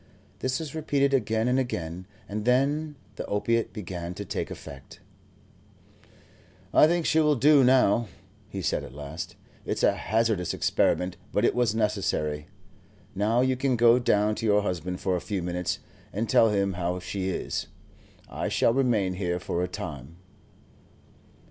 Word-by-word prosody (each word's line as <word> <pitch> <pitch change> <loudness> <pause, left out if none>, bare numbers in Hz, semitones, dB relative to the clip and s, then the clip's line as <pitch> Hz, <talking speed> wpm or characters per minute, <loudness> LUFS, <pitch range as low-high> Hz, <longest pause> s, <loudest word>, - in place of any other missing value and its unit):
This 130 +2 -1
was 155 -4 -6
repeated 140 -3 +1
again 110 -2 +1
and 125 +1 +2
again, 90 -7 -4 0.2
and 105 +1 -4
then 145 +5 +1 0.2
the - - -4
opiate 115 +3 0
began 90 -3 -6
to 100 - -6
take - - -3
effect. 70 -1 -10 1.7
"I - - +7
think 170 0 +1
she 160 - +3
will 150 -1 +4
do 140 +2 +5
now," 125 -3 +4 0.4
he 95 -3 -5
said, - - 0
at 65 - -10
last; 75 +6 -7 0.3
"it's - - -3
a - - +5
hazardous 110 -4 0
experiment, 90 0 +1
but - - +2
it - - +3
was 120 -3 +1
necessary. 95 -9 -1 0.7
Now 105 +5 +2
you 130 0 +2
can 130 0 +1
go 120 +1 +5
down 105 -3 +2
to - - -3
your 105 0 +3
husband 90 -1 -3
for 95 -1 +1
a 90 - -2
few 100 -4 -3
minutes, 90 0 -2 0.3
and 110 +3 -2
tell 115 +2 +5
him 100 -2 +1
how 90 0 -2
she 95 +1 -3
is. - - -3 0.6
I - - -3
shall 115 - +2
remain 115 -8 +1
here 90 -2 -2
for 85 - -2
a 90 - 0
time." 75 -3 -7
105 Hz, 160 wpm, -27 LUFS, 90-125 Hz, 1.7 s, I